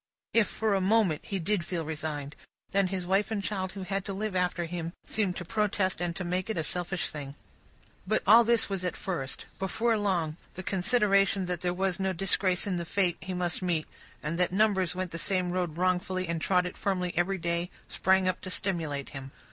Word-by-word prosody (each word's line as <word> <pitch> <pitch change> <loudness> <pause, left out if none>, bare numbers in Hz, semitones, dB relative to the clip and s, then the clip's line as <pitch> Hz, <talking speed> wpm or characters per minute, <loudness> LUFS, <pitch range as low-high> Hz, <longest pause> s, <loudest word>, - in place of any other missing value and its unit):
If, 225 -3 +4
for 220 -2 0
a 195 - +2
moment, 195 -5 +3
he 195 - -2
did 190 +1 0
feel 170 -2 -3
resigned, 150 -2 -4 0.4
then 195 -1 +3
his 185 -1 -3
wife 195 +3 +2
and 210 -3 -2
child 190 -2 -2
who 195 -1 -6
had 195 +1 -2
to 195 - -3
live 205 0 -3
after 180 -1 +1
him, 170 0 -4
seemed 200 -4 0
to 175 - -5
protest 200 -2 0
and 175 -1 -1
to 185 - -3
make 180 +3 -2
it 220 - -1
a 160 - 0
selfish 180 +2 -1
thing. 140 -2 -7 0.7
But, 215 +2 +1
all 225 +4 +8
this 235 0 +3
was 195 -2 -2
at 180 - -2
first. 165 -9 -4
Before 225 +5 +1
long, 170 -6 0 0.2
the 185 - -6
consideration 195 -1 +3
that 180 -1 -3
there 180 - +1
was 190 +1 -1
no 190 0 0
disgrace 185 0 +2
in 190 -3 -1
the 170 - -2
fate 180 0 +2
he 185 0 -4
must 175 -1 +1
meet, 170 -4 0 0.4
and 160 +3 -2
that 180 - +2
numbers 190 -3 +2
went 185 -1 -3
the 165 - -4
same 185 -1 +1
road 175 -3 -1
wrongfully, 185 0 0
and 165 -1 -2
trod 180 0 +3
it 180 - -5
firmly 180 -3 -1
every 185 +3 +1
day, 170 0 -1 0.2
sprang 190 0 +2
up 185 - 0
to 185 - -6
stimulate 165 -8 -1
him. 135 -1 -8
185 Hz, 210 wpm, -29 LUFS, 175-195 Hz, 0.7 s, all